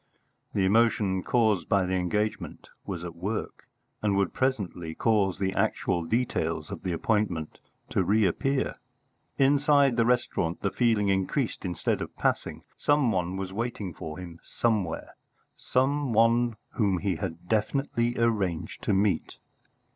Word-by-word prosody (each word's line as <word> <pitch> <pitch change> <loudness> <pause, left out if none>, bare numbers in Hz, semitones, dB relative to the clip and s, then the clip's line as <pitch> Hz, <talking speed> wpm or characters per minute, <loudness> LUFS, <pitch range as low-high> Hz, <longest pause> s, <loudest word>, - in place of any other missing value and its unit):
The 95 - +2
emotion 105 -2 +3
caused 110 -4 +1
by 100 -2 +3
the 90 - -2
engagement 100 +4 -2 0.2
was 90 -4 -4
at 85 -1 -6
work, 100 +6 -4 0.3
and 105 -2 +1
would 100 - +1
presently 95 -11 -2
cause 100 -5 +2
the 95 -1 -1
actual 85 -1 0
details 115 +9 -1
of - - -6
the 95 - -2
appointment 85 -3 -1 0.3
to 95 - +2
reappear. 110 +8 +1 0.6
Inside 140 -1 +4
the 115 - +4
restaurant 120 -8 0
the 100 - 0
feeling 110 -5 +2
increased, 95 +6 -1
instead 90 -3 -1
of - - -6
passing: - - -1 0.2
some 145 -5 +3
one 90 -1 -1
was 95 -1 -4
waiting 105 -4 -3
for 80 +1 -7
him 85 -2 -9
somewhere 105 -8 -1 0.4
some 135 0 0
one 115 +1 +3 0.2
whom 100 -5 +2
he 95 -2 -1
had 85 +3 -6
definitely 120 +2 0
arranged 105 -8 0
to - - +2
meet. 95 -4 +1
105 Hz, 140 wpm, -27 LUFS, 90-120 Hz, 0.6 s, Inside